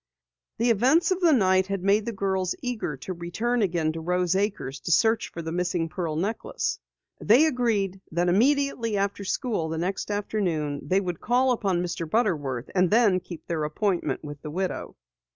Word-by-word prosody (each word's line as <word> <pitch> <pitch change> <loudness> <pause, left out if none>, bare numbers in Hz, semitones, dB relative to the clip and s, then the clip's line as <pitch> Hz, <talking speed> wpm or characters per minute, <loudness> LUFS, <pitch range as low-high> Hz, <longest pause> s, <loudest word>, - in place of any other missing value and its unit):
The 235 +1 +3
events 270 - +3
of 370 - +1
the 340 -2 +5
night 190 -7 +3
had 195 -2 -3
made 205 +3 +2
the - - 0
girls 190 -3 -1
eager 230 - -3
to 160 +9 -6
return 220 +8 -1
again 170 -5 +1
to 165 +1 -6
Rose 180 +1 +1
Acres 195 -9 -2
to 175 - -4
search 220 +7 +3
for 170 - -7
the 160 - -4
missing 175 -1 -1
pearl 165 -2 -3
necklace. 220 - -2 0.4
They 245 +9 +5
agreed 220 - 0
that 175 +2 +1
immediately 230 +2 +2
after 200 0 -1
school 200 - -1
the 160 - -3
next 185 +5 -2
afternoon 180 -8 -1
they 190 +1 +2
would 180 -3 -4
call 255 +2 +2
upon 190 -7 0
Mr. 165 -2 -4
Butterworth 150 - 0
and 180 -2 +3
then 210 -4 +4
keep 175 -2 -10
their 165 -3 -2
appointment 160 -2 -1
with 145 -1 -8
the 150 - -6
widow. 185 +4 -3
190 Hz, 180 wpm, -26 LUFS, 170-225 Hz, 0.4 s, the